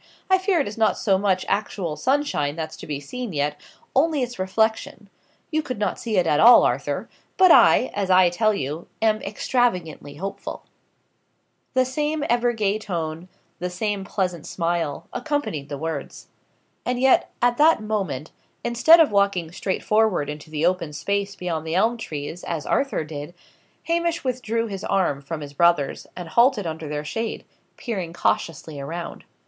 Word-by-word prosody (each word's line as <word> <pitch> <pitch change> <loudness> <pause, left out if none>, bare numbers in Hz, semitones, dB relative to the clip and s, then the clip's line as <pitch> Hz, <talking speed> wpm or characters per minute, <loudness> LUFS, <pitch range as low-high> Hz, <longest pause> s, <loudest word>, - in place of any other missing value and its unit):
"I 375 - +6
fear 375 -2 +1
it 280 - 0
is 210 +2 -7
not 220 - +3
so 195 -3 +2
much 190 -2 +1
actual 195 -5 -2
sunshine 245 - 0
that's 160 -1 -5
to - - -10
be 145 -2 -3
seen 230 - -6
yet 145 0 -1 0.3
only 295 0 +3
its 245 -4 -6
reflection. 205 +1 -1 0.4
You 310 0 +1
could 255 -6 -5
not 205 -3 -1
see 220 -4 -2
it 180 - +3
at 150 -2 +2
all, 240 +6 +9
Arthur; - - -1 0.3
but 370 -2 +7
I, 255 - +6
as 200 -2 -2
I 185 -1 +6
tell 215 +5 +2
you, 155 -3 -4
am 215 -1 +2
extravagantly 185 - -1
hopeful." 195 +6 -6 1.1
The 255 0 +4
same 295 +3 -1
ever 240 0 +3
gay 215 -2 0
tone, 165 -4 -4 0.3
the 180 - -2
same 200 +2 -2
pleasant 180 -4 -3
smile, 165 -2 -2
accompanied 290 - -2
the 145 - -4
words. 160 -1 -5 0.5
And 250 0 -1
yet, 265 0 +4
at 240 0 +2
that 305 -6 +5
moment, 190 -10 -3 0.3
instead 235 +8 +6
of 320 -7 +5
walking 200 -5 +1
straightforward 195 -3 0
into 150 +1 -9
the 155 +1 -1
open 175 -4 0
space 200 +5 -2
beyond 165 -4 -4
the 160 - -1
elm 225 +5 +2
trees, 155 -4 -6
as 160 -3 -4
Arthur 275 - 0
did, 150 +2 -8 0.5
Hamish 335 0 0
withdrew 230 -3 -1
his 200 -3 -6
arm 185 -8 0
from 155 +2 -6
his 145 -1 -8
brother's, 170 -2 +2
and 175 -2 -7
halted 235 0 +3
under 160 -2 -5
their 150 0 -4
shade, 225 +8 -4 0.3
peering 190 -9 -4
cautiously 160 -3 -1
around. 165 +5 -6
195 Hz, 165 wpm, -23 LUFS, 160-235 Hz, 1.1 s, all